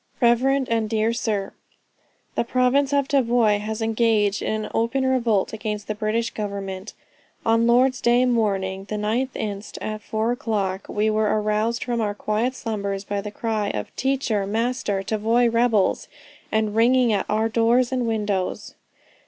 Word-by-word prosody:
"REV. 260 Hz, +3 st, +3 dB
AND 225 Hz, -2 st, 0 dB
DEAR 220 Hz, +1 st, +1 dB
SIR, 210 Hz, -4 st, -2 dB, 0.8 s
"The -, -, 0 dB
province 255 Hz, +3 st, +2 dB
of 280 Hz, -1 st, +2 dB
Tavoy 235 Hz, -6 st, +3 dB
has 220 Hz, +2 st, -4 dB
engaged 220 Hz, -3 st, +2 dB
in 215 Hz, 0 st, -2 dB
an -, -, -9 dB
open 250 Hz, +4 st, 0 dB
revolt 235 Hz, -7 st, +1 dB
against 210 Hz, -1 st, -4 dB
the 215 Hz, -, -1 dB
British 215 Hz, +2 st, -1 dB
government. 200 Hz, -1 st, -5 dB, 0.5 s
On 230 Hz, 0 st, +3 dB
Lord's 255 Hz, +2 st, +3 dB
day 240 Hz, +1 st, +4 dB
morning, 195 Hz, -5 st, 0 dB
the 210 Hz, -, -4 dB
9th 225 Hz, +5 st, -1 dB
inst. 205 Hz, -1 st, -5 dB
at 215 Hz, 0 st, -4 dB
4 220 Hz, +2 st, -1 dB
o'clock, 200 Hz, -5 st, -2 dB
we 215 Hz, +1 st, +1 dB
were 215 Hz, 0 st, +1 dB
aroused 215 Hz, +2 st, 0 dB
from 240 Hz, -2 st, -1 dB
our 205 Hz, -1 st, -1 dB
quiet 220 Hz, +5 st, -1 dB
slumbers 200 Hz, -5 st, -3 dB
by 205 Hz, 0 st, -3 dB
the 210 Hz, -, -6 dB
cry 215 Hz, -1 st, -2 dB
of 105 Hz, -1 st, -5 dB
'Teacher, 255 Hz, -7 st, 0 dB
master, 220 Hz, -2 st, -1 dB
Tavoy 225 Hz, +4 st, +2 dB
rebels,' 230 Hz, -4 st, +2 dB, 0.4 s
and 215 Hz, -1 st, 0 dB
ringing 240 Hz, 0 st, +4 dB
at 200 Hz, -, -1 dB
all 210 Hz, -, +1 dB
our 220 Hz, +1 st, +2 dB
doors 235 Hz, +3 st, +2 dB
and 250 Hz, -2 st, 0 dB
windows. 205 Hz, -4 st, -2 dB
220 Hz, 160 wpm, -23 LUFS, 210-240 Hz, 0.8 s, day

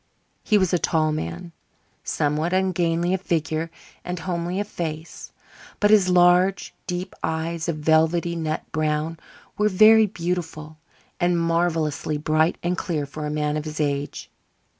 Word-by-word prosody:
He 210 Hz, -, +3 dB
was 185 Hz, -3 st, +1 dB
a 180 Hz, -, +3 dB
tall 155 Hz, -2 st, +1 dB
man, 85 Hz, -, -5 dB, 0.5 s
somewhat 150 Hz, +4 st, -1 dB
ungainly 175 Hz, -2 st, +1 dB
of 190 Hz, -, -1 dB
figure 160 Hz, -2 st, -1 dB, 0.3 s
and 180 Hz, 0 st, -4 dB
homely 175 Hz, +2 st, -3 dB
of 205 Hz, -, -2 dB
face. 160 Hz, -4 st, -6 dB, 0.5 s
But 210 Hz, 0 st, +3 dB
his 200 Hz, -4 st, +5 dB
large, 180 Hz, +2 st, +4 dB
deep 180 Hz, 0 st, -4 dB
eyes 160 Hz, +1 st, -2 dB
of 165 Hz, -, 0 dB
velvety 160 Hz, +3 st, +2 dB
nut 155 Hz, -2 st, -2 dB
brown 155 Hz, +1 st, -1 dB, 0.4 s
were 210 Hz, 0 st, +3 dB
very 215 Hz, +3 st, +6 dB
beautiful 165 Hz, -5 st, -4 dB, 0.4 s
and 175 Hz, 0 st, +2 dB
marvellously 165 Hz, -3 st, 0 dB
bright 155 Hz, +2 st, +1 dB
and 175 Hz, +1 st, 0 dB
clear 160 Hz, -4 st, -2 dB
for 150 Hz, +2 st, -6 dB
a -, -, -3 dB
man 150 Hz, 0 st, -1 dB
of 150 Hz, -, -4 dB
his 155 Hz, 0 st, -6 dB
age. 145 Hz, -1 st, -2 dB
165 Hz, 145 wpm, -23 LUFS, 155-180 Hz, 0.5 s, very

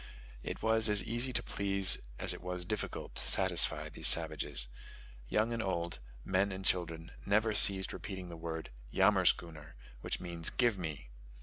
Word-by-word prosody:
It -, -, -7 dB
was 110 Hz, 0 st, +2 dB
as 105 Hz, -2 st, +4 dB
easy 120 Hz, +5 st, -1 dB
to -, -, 0 dB
please 100 Hz, -1 st, +2 dB, 0.2 s
as -, -, +1 dB
it -, -, -10 dB
was 90 Hz, 0 st, -5 dB
difficult 105 Hz, +4 st, -5 dB
to -, -, -2 dB
satisfy 95 Hz, -3 st, +2 dB
these -, -, +3 dB
savages. 65 Hz, -4 st, +3 dB, 0.6 s
Young 110 Hz, -, 0 dB
and 115 Hz, -, -2 dB
old, 85 Hz, -, -3 dB, 0.3 s
men 95 Hz, +2 st, 0 dB
and 95 Hz, 0 st, -7 dB
children, 85 Hz, -3 st, -1 dB
never 110 Hz, +2 st, +1 dB
ceased 95 Hz, -2 st, +4 dB
repeating 95 Hz, -3 st, -7 dB
the 85 Hz, -, -9 dB
word 80 Hz, -1 st, -6 dB, 0.2 s
"yammerschooner," 90 Hz, -5 st, +2 dB, 0.3 s
which -, -, -4 dB
means 85 Hz, -2 st, -1 dB
"give 120 Hz, -6 st, +1 dB
me." 80 Hz, -8 st, -7 dB
95 Hz, 160 wpm, -32 LUFS, 85-105 Hz, 0.6 s, as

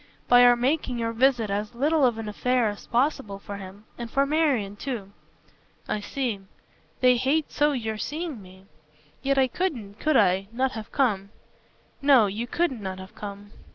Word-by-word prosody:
"By 245 Hz, 0 st, +7 dB
our 245 Hz, 0 st, +7 dB
making 255 Hz, +1 st, 0 dB
your 230 Hz, -1 st, -1 dB
visit 240 Hz, -3 st, +2 dB
as 210 Hz, +4 st, -3 dB
little 295 Hz, +4 st, +2 dB
of 235 Hz, -2 st, -1 dB
an 225 Hz, -1 st, -5 dB
affair 245 Hz, +2 st, +1 dB
as 205 Hz, -, -8 dB
possible 240 Hz, -5 st, 0 dB
for 200 Hz, 0 st, -8 dB
him 195 Hz, +2 st, -11 dB
and 235 Hz, -1 st, -5 dB
for 275 Hz, +4 st, +2 dB
Marian 280 Hz, -10 st, +1 dB
too." 210 Hz, -4 st, -5 dB, 0.8 s
"I 215 Hz, -, -1 dB
see. 235 Hz, -1 st, -3 dB, 0.6 s
They 250 Hz, -1 st, +5 dB
hate 280 Hz, +5 st, 0 dB
so 295 Hz, 0 st, +2 dB
your 220 Hz, -4 st, -3 dB
seeing 305 Hz, -4 st, -4 dB
me. 185 Hz, 0 st, -15 dB, 0.6 s
Yet 275 Hz, 0 st, +1 dB
I 265 Hz, -1 st, +4 dB
couldn't 235 Hz, -, -3 dB
could 310 Hz, -3 st, +2 dB
I? 190 Hz, +2 st, +3 dB
not 255 Hz, +3 st, 0 dB
have 220 Hz, -3 st, -8 dB
come." 205 Hz, -8 st, +1 dB, 0.7 s
"No, 275 Hz, -6 st, +6 dB
you 210 Hz, +4 st, -3 dB
couldn't 275 Hz, -6 st, -1 dB
not 190 Hz, -1 st, -5 dB
have 190 Hz, 0 st, -11 dB
come." 205 Hz, 0 st, -8 dB
235 Hz, 175 wpm, -26 LUFS, 205-275 Hz, 0.8 s, By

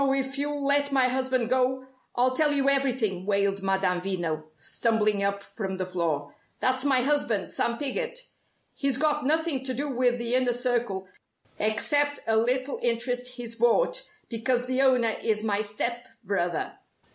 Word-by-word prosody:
if 270 Hz, 0 st, -1 dB
you'll 285 Hz, 0 st, -2 dB
let 285 Hz, 0 st, +2 dB
my 265 Hz, -2 st, +4 dB
husband 255 Hz, -1 st, 0 dB
go, 260 Hz, +1 st, +1 dB, 0.3 s
I'll 255 Hz, +1 st, +2 dB
tell 300 Hz, 0 st, +3 dB
you 275 Hz, -1 st, +2 dB
everything!" 250 Hz, -9 st, +1 dB
wailed 200 Hz, -1 st, +1 dB
Madame 190 Hz, -2 st, +1 dB
Veno; 170 Hz, -5 st, -2 dB
stumbling 210 Hz, +5 st, 0 dB
up 200 Hz, 0 st, 0 dB
from 190 Hz, -3 st, -5 dB
the 185 Hz, -, -2 dB
floor. 160 Hz, -6 st, -2 dB, 0.3 s
"That's 260 Hz, 0 st, +1 dB
my 270 Hz, -3 st, +3 dB
husband, 245 Hz, -7 st, 0 dB
Sam 235 Hz, 0 st, -1 dB
Piggott. 475 Hz, -, -2 dB, 0.6 s
He's 275 Hz, -3 st, 0 dB
got 300 Hz, -1 st, +1 dB
nothing 315 Hz, -3 st, +1 dB
to 260 Hz, -1 st, -2 dB
do 285 Hz, +4 st, -2 dB
with 245 Hz, -1 st, +1 dB
the 235 Hz, 0 st, -2 dB
Inner 255 Hz, -1 st, +3 dB
Circle, 240 Hz, -6 st, -1 dB, 0.5 s
except 290 Hz, +7 st, +1 dB
a 225 Hz, -, +2 dB
little 255 Hz, +4 st, +1 dB
interest 245 Hz, +1 st, 0 dB
he's 235 Hz, -2 st, -7 dB
bought, 250 Hz, -, +2 dB, 0.3 s
because 245 Hz, +2 st, 0 dB
the 255 Hz, +1 st, +1 dB
owner 250 Hz, -4 st, +4 dB
is 215 Hz, -1 st, 0 dB
my 210 Hz, -1 st, +1 dB
step 235 Hz, +3 st, -2 dB, 0.2 s
brother. 180 Hz, -4 st, -2 dB
245 Hz, 160 wpm, -27 LUFS, 205-270 Hz, 0.6 s, my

